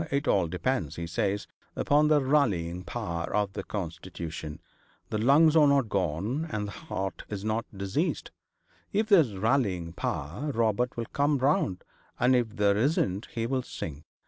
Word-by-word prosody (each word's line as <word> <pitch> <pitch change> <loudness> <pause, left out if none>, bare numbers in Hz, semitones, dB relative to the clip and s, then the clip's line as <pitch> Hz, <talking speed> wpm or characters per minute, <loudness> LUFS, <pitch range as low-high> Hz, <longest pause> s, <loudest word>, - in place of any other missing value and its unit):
It 140 +2 -1
all 95 -4 +3
depends, 90 - -1
he 85 - -4
says, 100 +4 -1 0.3
upon 150 +1 +3
the 150 -2 +4
rallying 95 - +1
power 85 -7 -4
of 105 -2 0
the - - -3
constitution. 85 -4 -6 0.5
The 110 - 0
lungs 150 +7 +5
are 155 -2 +7
not 140 -5 +3
gone, 100 - -1
and 105 -2 -2
the - - -6
heart 95 +1 -5
is 100 -1 -5
not 110 +2 0
diseased. 100 - -2 0.6
If 215 +1 0
there's 160 - +5
rallying 95 -7 +1
power, 85 - -3
Robert 115 +2 +1
will 115 - -2
come 145 +1 +2
round, 130 -9 +1 0.4
and 125 +1 +4
if 115 -3 0
there 100 -1 +3
isn't 110 - +1
he'll 120 +3 0
sink. 75 - -7
110 Hz, 155 wpm, -28 LUFS, 90-135 Hz, 0.6 s, are